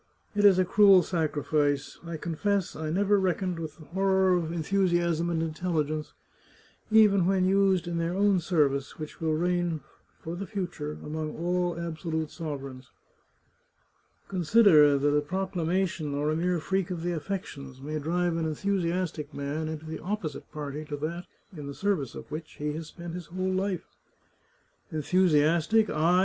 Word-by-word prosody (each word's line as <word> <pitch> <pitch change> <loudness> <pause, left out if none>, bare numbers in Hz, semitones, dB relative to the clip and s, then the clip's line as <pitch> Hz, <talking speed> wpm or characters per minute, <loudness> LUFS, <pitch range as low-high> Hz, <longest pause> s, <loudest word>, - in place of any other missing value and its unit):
" - - -38
It 205 0 +3
is 195 -3 +7
a 185 - +3
cruel 195 -1 +6
sacrifice. 150 -4 0
I 170 -1 -5
confess 190 +4 -1
I 155 0 -4
never 200 +4 +3
reckoned 185 -1 -1
with 155 -2 -6
the 155 - -13
horror 190 +3 +2
of 165 -2 -1
enthusiasm 170 -1 +1
and 165 -1 0
intelligence, 155 -2 -2 0.8
even 210 -5 +5
when 190 -1 +3
used 190 -2 +3
in 170 -1 -2
their 170 +2 -1
own 200 -1 +3
service, 145 -6 0
which 155 +1 -8
will 160 -1 +1
reign 175 -1 0 0.4
for 165 +1 -6
the 195 +2 -5
future 175 -7 -4
among 155 0 -4
all 175 0 0
absolute 160 -2 -3
sovereigns." 140 -5 -6 0.7
" - - -41
Consider 170 -6 +5
that 145 +1 +2
a 150 - +3
proclamation, 175 -2 -1
or 150 +2 0
a - - 0
mere 175 +2 +1
freak 190 +3 -1
of 175 -3 -4
the 175 - 0
affections, 150 -6 -5
may 155 +3 -4
drive 170 +2 0
an 165 - -1
enthusiastic 170 -2 -1
man 145 +3 -3
into 155 0 -6
the 160 0 -5
opposite 180 -5 -4
party 150 0 -5
to 150 -1 -5
that 170 +4 -4 0.3
in 145 -3 -7
the 140 - -6
service 190 - -1
of - - -10
which 155 +1 -6
he 150 0 -3
has 160 0 -6
spent 170 +1 -8
his 175 -3 -6
whole 185 +1 -2
life." 190 -1 -1 0.6
" - - -39
Enthusiastic! 170 +5 +3
I! 165 +4 +3
170 Hz, 165 wpm, -28 LUFS, 155-185 Hz, 0.8 s, is